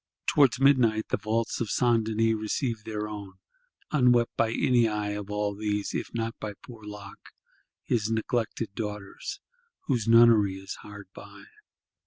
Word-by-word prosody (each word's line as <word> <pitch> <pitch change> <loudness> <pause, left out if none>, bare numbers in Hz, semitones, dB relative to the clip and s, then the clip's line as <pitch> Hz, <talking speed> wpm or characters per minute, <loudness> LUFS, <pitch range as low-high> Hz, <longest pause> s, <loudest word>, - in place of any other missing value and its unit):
Towards 135 -3 +4
midnight 125 -6 +3
the - - +1
vaults 115 +2 -2
of 115 - -2
St. 120 -2 +2
Denis 110 +1 +1
receive 110 +1 -2
their 105 -1 -3
own; 100 -3 -8 0.6
unwept 125 -5 +3
by 115 -1 +1
any 120 0 +3
eye 105 -1 -2
of 105 -1 -5
all 105 0 -1
these; 105 0 -2
if - - -3
not 115 -1 -3
by 105 -1 -5
poor 115 -3 -12
Loque 105 -1 -10 0.5
his 110 -2 0
neglected 115 -1 -2
Daughter's, 105 - -6 0.4
whose 120 -6 -1
Nunnery 115 -4 +6
is 95 0 -7
hard 100 -1 -10
by. - - -12
110 Hz, 150 wpm, -27 LUFS, 105-115 Hz, 0.6 s, Nunnery